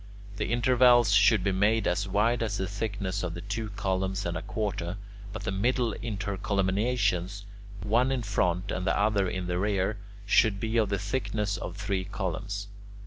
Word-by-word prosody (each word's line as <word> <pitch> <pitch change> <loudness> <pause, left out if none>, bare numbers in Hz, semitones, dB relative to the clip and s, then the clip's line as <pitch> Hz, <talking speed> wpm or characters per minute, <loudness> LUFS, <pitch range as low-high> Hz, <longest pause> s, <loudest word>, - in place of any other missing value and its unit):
The - - -1
intervals 120 -2 +5
should 100 0 +5
be 100 - +2
made 105 +4 +2
as 95 +3 0
wide 110 +5 +2
as 105 -3 -1
the 95 - -1
thickness 100 -1 -3
of 85 -2 -4
two 110 +1 -3
columns 95 -1 -2
and 85 0 -2
a 80 - -3
quarter, 100 -4 -3 0.3
but 110 - -6
the - - -2
middle 120 +3 +1
intercolumniations, 100 -1 -1 0.4
one 120 +6 +2
in 130 -3 -1
front 95 -2 0
and 90 +1 -2
the - - +2
other 100 -2 +2
in 95 0 -3
the 90 0 -1
rear, 100 +1 0 0.3
should 100 0 +3
be 110 +2 -1
of 110 -3 +2
the 100 - 0
thickness 105 0 -2
of 90 0 -6
three 100 -2 -1
columns. 100 +1 -4
100 Hz, 170 wpm, -28 LUFS, 95-110 Hz, 0.4 s, intervals